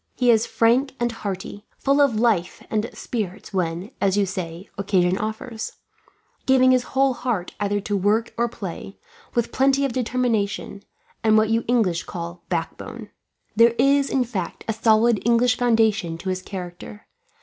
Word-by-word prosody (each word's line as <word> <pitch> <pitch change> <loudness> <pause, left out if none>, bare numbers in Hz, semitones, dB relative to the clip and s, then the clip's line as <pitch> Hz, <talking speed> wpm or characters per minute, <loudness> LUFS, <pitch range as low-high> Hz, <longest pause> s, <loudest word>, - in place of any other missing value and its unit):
He 245 -1 +4
is 225 0 +3
frank 250 +4 +2
and 240 0 0
hearty, 200 -2 -6
full 280 +1 +2
of 255 -7 +3
life 220 -7 +1
and 220 +2 0
spirits 210 -4 -5
when, 180 +3 -2
as 195 0 +2
you 205 - +3
say, 180 -1 -6
occasion 185 -2 +1
offers; 220 +2 -5 0.7
giving 255 -1 +5
his 255 -1 +4 0.2
whole 270 -1 +4
heart 240 -8 -3
either 205 0 0
to 205 +1 -2
work 210 +4 +1
or 235 0 0
play, 195 -2 -7 0.4
with 235 -1 0
plenty 275 +1 +3
of 265 - -2
determination, 230 -5 -1 0.4
and 220 -1 +5
what 215 0 +3
you 225 0 +2
English 215 -8 +1
call 170 0 -7
backbone. 205 +5 -4 0.4
There 230 +1 +5
is, 275 +2 +3
in 265 - +2
fact, 210 -8 -5
a 220 - 0
solid 220 0 +3
English 235 +2 +3
foundation 220 -8 +2
to 185 +3 -5
his 185 0 -2
character. 185 +2 -8
220 Hz, 160 wpm, -23 LUFS, 195-240 Hz, 0.7 s, giving